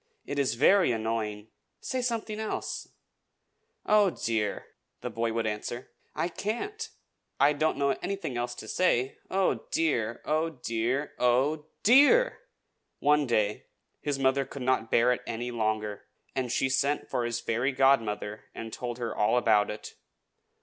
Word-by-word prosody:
It 145 - -3
is 135 -4 +1
very 185 +6 +5
annoying. 110 -2 -2 0.3
Say 260 -1 -2
something 230 -3 -2
else." 220 - -4 1.0
"Oh, 210 -2 +5
dear!" 110 - -2 0.4
the - - -4
boy 115 0 -1
would 115 0 -1
answer, 110 +3 -4 0.2
"I 160 +2 0
can't! 400 - -4 0.5
I 145 +2 +5
don't 155 +2 0
know 140 -1 +2
anything 195 -10 -3
else 120 0 -2
to - - -9
say. 135 -8 +1
Oh, 190 0 0
dear! 120 -9 0
Oh, 155 +2 +1
dear!! 120 +6 -1
oh, 135 +5 +2 0.2
DEAR!!!" 290 - +6 0.6
One 150 -1 +3
day 105 -3 0 0.3
his 145 -2 -1
mother 135 0 +2
could 135 0 -8
not 125 -3 +1
bear 120 +2 +4
it 125 - -5
any 120 +2 -3
longer, 110 -2 -2 0.3
and 130 -3 -1
she 135 - +2
sent 140 +2 +1
for 120 - -1
his 120 0 -1
fairy 120 +4 0
godmother, 115 -6 +1
and 115 -1 -7
told 120 -1 -4
her 120 -2 -3
all 105 +3 +2
about 110 -4 +3
it. 105 - -7
130 Hz, 150 wpm, -28 LUFS, 115-155 Hz, 1.0 s, DEAR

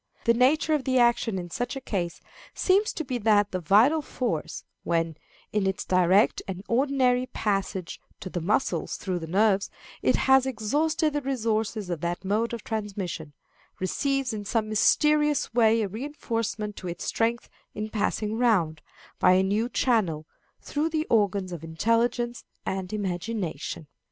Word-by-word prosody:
The 235 - +4
nature 280 +6 +3
of 295 -3 +1
the 260 0 +1
action 235 -4 +3
in 175 -2 -6
such 245 +7 -3
a - - -3
case 185 -9 -3 0.3
seems 395 +3 +3
to 320 - -4
be 255 -2 -2
that 205 -2 +3
the 185 - -2
vital 220 - +4
force, 235 - -3 0.2
when, 165 -1 0 0.4
in 205 -2 +1
its 190 - -2
direct 185 +2 +3
and 190 0 -5
ordinary 255 0 +2
passage 195 -5 -2 0.2
to - - -7
the 175 -1 -4
muscles 215 +10 0
through 185 -3 -3
the 165 - -7
nerves, 200 +2 +2 0.3
it - - +3
has 265 0 +4
exhausted 295 +7 0
the 290 - -1
resources 220 -6 -1
of 165 -4 -3
that 175 +2 -3
mode 215 +4 0
of 235 -2 -5
transmission, 195 -8 -4 0.5
receives 270 +6 0
in 210 -1 -4
some 215 +1 -1
mysterious 295 +6 +3
way 225 -1 +4
a - - -1
reinforcement 225 -3 -4
to 185 - -6
its 175 - -5
strength 230 +1 0 0.3
in 215 0 -3
passing 215 0 -1
round, 180 -11 +2 0.4
by 185 - +6
a 185 +1 +4
new 210 +5 0
channel, 190 - +1 0.4
through 300 +2 -1
the 315 -1 -1
organs 200 -4 +2
of 170 -3 -6
intelligence 230 +8 0 0.2
and 190 -1 -3
imagination. 185 -5 -3
215 Hz, 155 wpm, -26 LUFS, 185-250 Hz, 0.5 s, by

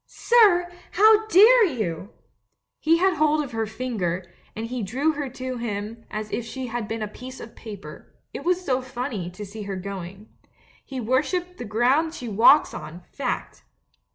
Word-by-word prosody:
"Sir, 390 -7 +4 0.2
how 435 +2 +5
dare 445 +4 +7
you?" 215 - -2 0.7
He 325 +1 +3
had 370 0 +2
hold 305 0 +3
of 275 - -8
her 225 -1 -2
finger, 200 -7 -3 0.3
and 220 - -4
he 245 +1 -4
drew 260 +10 0
her 290 -3 -4
to 255 0 -5
him 225 0 -5
as 215 0 -5
if 240 - -2
she 255 +3 -6
had 235 -2 -4
been 225 0 -3
a - - -2
piece 255 +5 -10
of 230 - -10
paper 210 -3 -10
— - - -49
it - - -6
was 360 +1 0
so 260 -1 +1
funny, 245 -8 -4
to 205 +4 -8
see 210 +2 -9
her 200 -1 -4
going. 195 +1 -7 0.6
He 265 -2 -6
worships 300 +10 0
the 245 - -7
ground 255 +10 +2
she 245 - -6
walks 230 +8 +5
on, 155 +3 -8
fact! 260 -3 -4
245 Hz, 180 wpm, -24 LUFS, 210-305 Hz, 0.7 s, dare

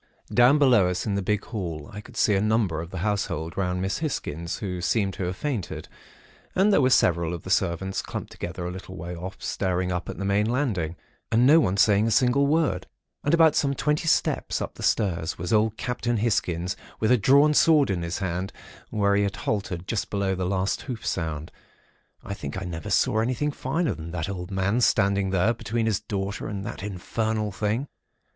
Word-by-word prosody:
"Down, 125 +4 +6
below 125 -10 +5
us 90 - -2
in 105 - -1
the 100 - 0
big 105 +2 -1
hall, 85 -9 -5
I 105 - -6
could - - -14
see 105 - +3
a 95 - +2
number 105 -7 +1
of 85 - -7
the 95 - -7
household 90 -6 -2
round 90 -1 -1
Miss 95 - -1
Hisgins, 85 - -3
who 90 -4 -4
seemed 95 +1 +1
to 95 - -3
have 90 +1 -2
fainted; 130 -11 -3 0.7
and 200 +3 +4
there 145 - +5
were 130 - +4
several 85 -8 +3
of 85 - -9
the 95 - -5
servants 95 0 0
clumped - - -6
together 85 +1 -5
a 90 - -3
little 95 +1 -8
way 85 +2 -6
off, 90 +3 -6
staring 90 -1 -1
up 90 -1 -3
at - - -6
the 100 - -3
main 100 +2 +2
landing, 105 - -1 0.4
and 115 +2 +4
no 155 +5 +7
one 100 - +1
saying 105 +1 +4
a - - +2
single 125 +4 +3
word. 145 - +1 0.4
And 145 +3 +3
about 165 -2 +6
some 140 -1 +1
twenty 150 +4 0
steps - - +1
up - - -4
the - - -12
stairs 85 -6 0
was 90 +6 -3
old 110 0 +2
Captain 120 -2 -1
Hisgins 90 -5 0 0.2
with 110 - +2
a - - +7
drawn 140 +7 +5
sword 150 -6 +5
in 90 -3 -1
his 85 0 -3
hand, 95 0 -3 0.4
where 100 -1 +2
he 100 - +3
had 100 -1 -1
halted 95 -4 -3
just 115 - -2
below 100 -2 0
the 90 -1 -2
last 95 0 0
hoof 120 -5 -6
sound. 80 -3 -3 0.7
I 100 - -5
think 100 - -5
I 95 - -6
never 85 -3 -5
saw 110 - +2
anything 130 +6 0
finer 155 +5 -1
than 80 0 -8
the 85 +2 -3
old 90 -2 -6
man 100 +5 0
standing 100 -3 +3
there 95 +4 +2
between 115 0 -2
his 110 -4 +1
daughter 100 -1 -4
and 100 -2 -5
that 110 -4 -6
infernal 105 +2 -2
thing. 105 +7 -1
100 Hz, 205 wpm, -25 LUFS, 90-115 Hz, 0.7 s, no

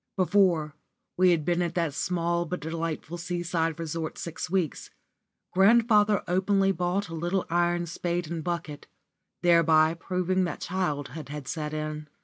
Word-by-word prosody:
Before 180 -5 +2 0.4
we 185 0 +5
had 165 -4 +2
been 175 0 +1
at 170 -1 -2
that 165 -4 0
small 170 +2 0
but 180 +2 -3
delightful 165 +1 -4
sea 175 0 -3
side 165 -2 -1
resort 165 -1 -4
six 160 -1 -5
weeks, 180 -4 -1 0.6
grandfather 210 +1 +4
openly 195 +2 +2
bought 180 +2 -1
a - - -7
little 175 +3 -1
iron 175 0 +1
spade 175 0 -3
and 165 -2 -3
bucket, 165 -4 -4 0.6
thereby 165 -2 +5
proving 185 +2 -1
that 175 - -4
childhood 150 -5 -3
had 145 -2 -7
set 150 -2 -3
in. 155 0 -4
170 Hz, 145 wpm, -27 LUFS, 160-180 Hz, 0.6 s, we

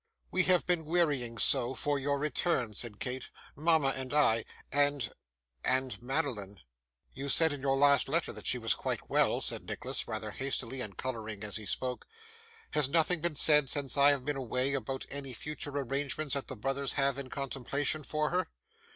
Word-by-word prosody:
'We 185 0 +2
have 180 -1 +4
been 175 -3 0
wearying 145 -8 +1
so 130 +2 +3
for 145 -1 -1
your 140 +1 0
return,' 140 -4 -1
said 105 -1 -2
Kate, 130 0 -5 0.3
'mama 155 -2 +3
and 130 +1 -2
I, 115 -7 +4 0.3
and 145 -4 +2 0.5
and 130 -1 0
Madeline.' 120 -8 -2 0.5
'You 140 +1 -5
said 160 +2 +4
in 140 - -7
your 135 0 +1
last 140 -1 +5
letter - - 0
that - - -6
she - - +2
was - - +1
quite - - -4
well,' - - +3
said - - +1
Nicholas, - - -3
rather - - -4
hastily, 130 -1 -3
and 100 -6 -5
colouring 110 -5 -5
as 105 0 0
he 110 -2 -7
spoke. 125 +5 -3 0.6
'Has 150 -3 +3
nothing 165 +2 +2
been 170 -2 -1
said, 150 -2 +5
since 140 -3 +1
I 140 0 +7
have 140 -3 +1
been 145 0 0
away, 130 +1 0
about 135 0 -3
any 135 -2 -1
future 150 +4 -6
arrangements 140 +1 -2
that 140 -1 -2
the 130 - -6
brothers 135 +4 -1
have 140 -1 +1
in 135 -2 -6
contemplation 140 +3 -2
for 150 +1 -2
her? 185 +1 0
140 Hz, 180 wpm, -31 LUFS, 130-145 Hz, 0.6 s, I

